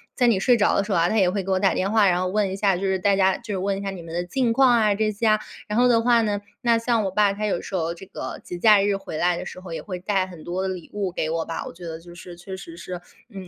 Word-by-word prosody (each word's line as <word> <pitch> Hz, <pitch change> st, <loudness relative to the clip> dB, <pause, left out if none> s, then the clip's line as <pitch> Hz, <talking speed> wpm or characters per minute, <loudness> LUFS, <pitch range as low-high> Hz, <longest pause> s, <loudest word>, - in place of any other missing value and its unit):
在 245 Hz, -, +3 dB
你 225 Hz, -5 st, +3 dB
睡 245 Hz, +5 st, +4 dB
着 210 Hz, -, +3 dB
的 -, -, +2 dB
时 205 Hz, -, -6 dB
候 180 Hz, -, +2 dB
啊， 170 Hz, +1 st, +3 dB
他 220 Hz, -, 0 dB
也 190 Hz, -4 st, +4 dB
会 200 Hz, +1 st, -1 dB
给 190 Hz, -, -7 dB
我 190 Hz, -, +3 dB
打 195 Hz, 0 st, +3 dB
电 195 Hz, +2 st, -1 dB
话， 215 Hz, -2 st, +4 dB
然 180 Hz, -1 st, +2 dB
后 185 Hz, -, 0 dB
问 200 Hz, 0 st, 0 dB
一 -, -, -3 dB
下 195 Hz, -1 st, +2 dB
就 190 Hz, -, -6 dB
是 190 Hz, -1 st, 0 dB
大 200 Hz, +2 st, +3 dB
家 190 Hz, -1 st, +3 dB
就 230 Hz, -3 st, -7 dB
是 -, -, -1 dB
问 195 Hz, +1 st, -1 dB
一 -, -, -6 dB
下 200 Hz, -, -3 dB
你 190 Hz, -3 st, -7 dB
们 165 Hz, 0 st, -9 dB
的 175 Hz, +1 st, -1 dB
近 235 Hz, +6 st, 0 dB
况 265 Hz, +2 st, +5 dB
啊， 220 Hz, -3 st, +4 dB
这 215 Hz, +1 st, 0 dB
些 210 Hz, +2 st, -3 dB
啊。” 215 Hz, 0 st, +4 dB, 0.3 s
然 210 Hz, +2 st, 0 dB
后 250 Hz, -, +5 dB
的 235 Hz, -2 st, +4 dB
话 235 Hz, -1 st, +4 dB
呢， 205 Hz, -2 st, -1 dB, 0.2 s
那 235 Hz, -2 st, +3 dB
像 230 Hz, -1 st, +1 dB
我 -, -, 0 dB
爸 205 Hz, +1 st, +3 dB
他 210 Hz, +1 st, -3 dB
有 190 Hz, -, 0 dB
时 -, -, -10 dB
候 165 Hz, -2 st, -1 dB
这 185 Hz, -, -11 dB
个 -, -, -7 dB
节 175 Hz, -, -7 dB
假 210 Hz, +1 st, +6 dB
日 200 Hz, 0 st, +1 dB
回 195 Hz, -5 st, -7 dB
来 175 Hz, +2 st, +2 dB
的 -, -, -6 dB
时 -, -, -8 dB
候， 185 Hz, -2 st, -9 dB
也 -, -, -4 dB
会 185 Hz, -3 st, -6 dB
带 190 Hz, 0 st, 0 dB
很 175 Hz, -4 st, -12 dB
多 180 Hz, +2 st, -3 dB
的 190 Hz, -, -1 dB
礼 185 Hz, -3 st, -6 dB
物 200 Hz, -3 st, -2 dB
给 160 Hz, -2 st, -2 dB
我 165 Hz, 0 st, -1 dB
吧。 165 Hz, -, -5 dB
我 -, -, -8 dB
觉 175 Hz, +1 st, -11 dB
得 165 Hz, -1 st, -5 dB
就 175 Hz, +1 st, -14 dB
是 175 Hz, 0 st, -10 dB
确 190 Hz, +2 st, -8 dB
实 170 Hz, -3 st, -10 dB
是， 180 Hz, 0 st, -7 dB, 0.3 s
嗯， 190 Hz, -2 st, -8 dB
195 Hz, 365 characters per minute, -23 LUFS, 180-210 Hz, 0.3 s, 假